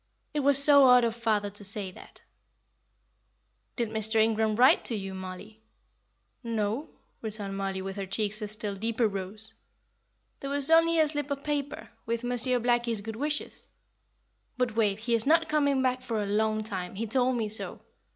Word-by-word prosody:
It 300 Hz, -, -1 dB
was 280 Hz, -1 st, +3 dB
so 280 Hz, -1 st, +7 dB
odd 250 Hz, -1 st, +6 dB
of 230 Hz, -1 st, 0 dB
father 215 Hz, -3 st, -1 dB
to 205 Hz, +1 st, -6 dB
say 200 Hz, -1 st, -1 dB
that." -, -, -15 dB, 1.5 s
"Did 235 Hz, -3 st, -2 dB
Mr. 220 Hz, 0 st, 0 dB
Ingram 220 Hz, -1 st, +2 dB
write 250 Hz, +4 st, +5 dB
to 235 Hz, -, +3 dB
you, 195 Hz, -2 st, -5 dB
Mollie?" 190 Hz, +4 st, -9 dB, 0.8 s
"No," 230 Hz, +5 st, -2 dB, 0.3 s
returned 210 Hz, -3 st, -5 dB
Mollie, 195 Hz, -1 st, -3 dB
with 195 Hz, +1 st, -6 dB
her 195 Hz, -1 st, -4 dB
cheeks 210 Hz, +2 st, -2 dB
a 210 Hz, -, -3 dB
still 210 Hz, -1 st, -5 dB
deeper 225 Hz, +3 st, 0 dB
rose. 200 Hz, +2 st, -7 dB, 0.9 s
"There 275 Hz, -, -6 dB
was 285 Hz, +1 st, 0 dB
only 330 Hz, 0 st, +5 dB
a 310 Hz, -, +4 dB
slip 290 Hz, -1 st, -3 dB
of 280 Hz, 0 st, -4 dB
paper, 290 Hz, -1 st, -4 dB, 0.2 s
with 235 Hz, +1 st, -2 dB
Monsieur 245 Hz, +1 st, +3 dB
Blackie's 240 Hz, -2 st, 0 dB
good 220 Hz, +1 st, -7 dB
wishes. 295 Hz, +3 st, -4 dB, 0.9 s
But 250 Hz, -3 st, -1 dB
Wave, 210 Hz, -3 st, +1 dB
he 230 Hz, +2 st, -2 dB
is 230 Hz, +2 st, +3 dB
not 325 Hz, +1 st, +4 dB
coming 285 Hz, -3 st, +1 dB
back 255 Hz, 0 st, 0 dB
for 230 Hz, -3 st, -3 dB
a -, -, -3 dB
long 215 Hz, +1 st, 0 dB
time 190 Hz, -4 st, -5 dB
he 225 Hz, +4 st, -3 dB
told 250 Hz, +2 st, +1 dB
me 225 Hz, -2 st, -1 dB
so. 215 Hz, +2 st, -1 dB
225 Hz, 175 wpm, -28 LUFS, 210-255 Hz, 1.5 s, so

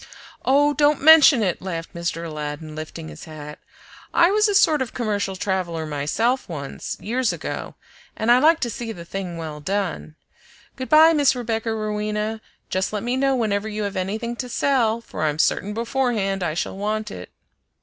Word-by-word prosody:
"Oh, 290 Hz, +2 st, +4 dB
don't 290 Hz, -1 st, +2 dB
mention 305 Hz, -6 st, +8 dB
it!" 180 Hz, -4 st, -1 dB
laughed 165 Hz, -3 st, -5 dB
Mr. 170 Hz, -1 st, -3 dB
Aladdin, 155 Hz, 0 st, -6 dB
lifting 155 Hz, -, -7 dB
his 75 Hz, -1 st, -10 dB
hat. 150 Hz, -1 st, -9 dB, 0.6 s
"I 340 Hz, +2 st, +5 dB
was 425 Hz, +1 st, +3 dB
a 410 Hz, -, 0 dB
sort 310 Hz, -7 st, +4 dB
of 255 Hz, -, -4 dB
commercial 205 Hz, -5 st, -1 dB
traveler 180 Hz, -4 st, -2 dB
myself 155 Hz, -, -1 dB
once, 140 Hz, -5 st, -6 dB
years 245 Hz, +1 st, 0 dB
ago, -, -, -5 dB, 0.4 s
and 220 Hz, +2 st, +2 dB
I 245 Hz, -, +7 dB
like 320 Hz, +4 st, +5 dB
to 240 Hz, -, 0 dB
see 230 Hz, +1 st, -5 dB
the 170 Hz, -6 st, -9 dB
thing 180 Hz, -1 st, -5 dB
well 155 Hz, -2 st, -6 dB
done. 185 Hz, -2 st, -3 dB, 0.6 s
Good 260 Hz, -1 st, -6 dB
by 315 Hz, +2 st, +7 dB
Miss 290 Hz, -4 st, +3 dB
Rebecca 230 Hz, -2 st, -2 dB
Rowena! 215 Hz, 0 st, -2 dB, 0.3 s
Just 185 Hz, +1 st, 0 dB
let 210 Hz, -1 st, -3 dB
me 245 Hz, +2 st, -1 dB
know 270 Hz, 0 st, +2 dB
whenever 215 Hz, -3 st, -1 dB
you 210 Hz, 0 st, -3 dB
have 200 Hz, -1 st, -3 dB
anything 215 Hz, +6 st, -3 dB
to 250 Hz, 0 st, -5 dB
sell, 235 Hz, -4 st, +1 dB
for 155 Hz, -, -8 dB
I'm 150 Hz, -1 st, 0 dB
certain 195 Hz, +5 st, +1 dB
beforehand 230 Hz, -5 st, -1 dB
I 170 Hz, -3 st, -1 dB
shall 175 Hz, -, -3 dB
want 215 Hz, +1 st, -2 dB
it." 90 Hz, 0 st, -8 dB
215 Hz, 180 wpm, -22 LUFS, 170-250 Hz, 0.6 s, mention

